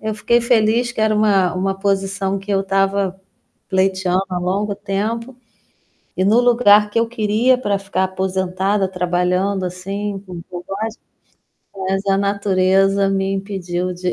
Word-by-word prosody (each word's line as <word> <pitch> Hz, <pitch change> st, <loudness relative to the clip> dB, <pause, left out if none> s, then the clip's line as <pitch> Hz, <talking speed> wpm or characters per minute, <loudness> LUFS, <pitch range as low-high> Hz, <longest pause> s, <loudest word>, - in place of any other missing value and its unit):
É, 220 Hz, -, -4 dB
eu 215 Hz, -, -3 dB
fiquei 235 Hz, +3 st, +2 dB
feliz 235 Hz, 0 st, +2 dB
que 230 Hz, -, -5 dB
era 215 Hz, 0 st, +2 dB
uma 200 Hz, -4 st, +2 dB
uma 195 Hz, +1 st, -1 dB
posição 195 Hz, 0 st, -1 dB
que 195 Hz, +2 st, -9 dB
eu 195 Hz, -1 st, +2 dB
estava 195 Hz, 0 st, 0 dB, 0.5 s
pleiteando 190 Hz, -1 st, +1 dB
há 180 Hz, -, -1 dB
longo 200 Hz, +3 st, -1 dB
tempo, 220 Hz, +6 st, -3 dB, 0.8 s
e 185 Hz, -, +1 dB
no 215 Hz, +5 st, +4 dB
lugar 230 Hz, -4 st, +5 dB
que 210 Hz, -, -3 dB
eu 230 Hz, -, +1 dB
queria 230 Hz, +2 st, +2 dB
para 205 Hz, -5 st, -1 dB
ficar 195 Hz, -1 st, -1 dB
aposentada, 190 Hz, +1 st, -1 dB
trabalhando 180 Hz, +1 st, 0 dB
assim, 195 Hz, +3 st, -4 dB
com 180 Hz, -3 st, -8 dB
com 175 Hz, -1 st, -7 dB
quase 220 Hz, +3 st, -5 dB, 0.9 s
Mas 195 Hz, +1 st, -1 dB
a 195 Hz, 0 st, +3 dB
natureza 195 Hz, 0 st, +2 dB
me 195 Hz, 0 st, 0 dB
impediu 185 Hz, -2 st, -3 dB
de 180 Hz, 0 st, -2 dB
195 Hz, 155 wpm, -19 LUFS, 190-210 Hz, 0.9 s, lugar